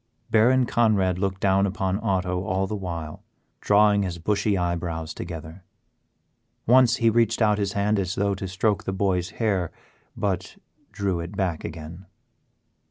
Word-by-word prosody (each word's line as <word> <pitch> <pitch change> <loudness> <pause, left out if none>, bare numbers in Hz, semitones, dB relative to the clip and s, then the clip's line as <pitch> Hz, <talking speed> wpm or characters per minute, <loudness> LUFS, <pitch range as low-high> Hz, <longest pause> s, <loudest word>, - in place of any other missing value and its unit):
Baron 125 +4 +4
Conrad 100 -7 +2
looked 95 0 -2
down 100 0 +3
upon 95 0 -1
Otto 90 -4 -1
all 95 -2 0
this 105 +1 -4
while, 85 -4 -6 0.4
drawing 105 0 +4
his 90 -3 -3
bushy 100 +3 0
eyebrows 85 -2 -2
together. 80 +2 -8 1.0
Once 125 0 +5
he 115 -1 +3
reached 115 0 +2
out 105 -2 +3
his 100 -1 -1
hand 105 +1 +1
as 95 -1 -2
though 100 0 +1
to 95 0 -5
stroke 100 +3 0
the 95 - -2
boy's 95 -2 0
hair, 100 -7 0 0.5
but 95 -2 -2 0.3
drew 95 -3 -1
it 85 +1 -7
back 90 -5 -1
again. 85 +3 -8
95 Hz, 150 wpm, -24 LUFS, 90-105 Hz, 1.0 s, Once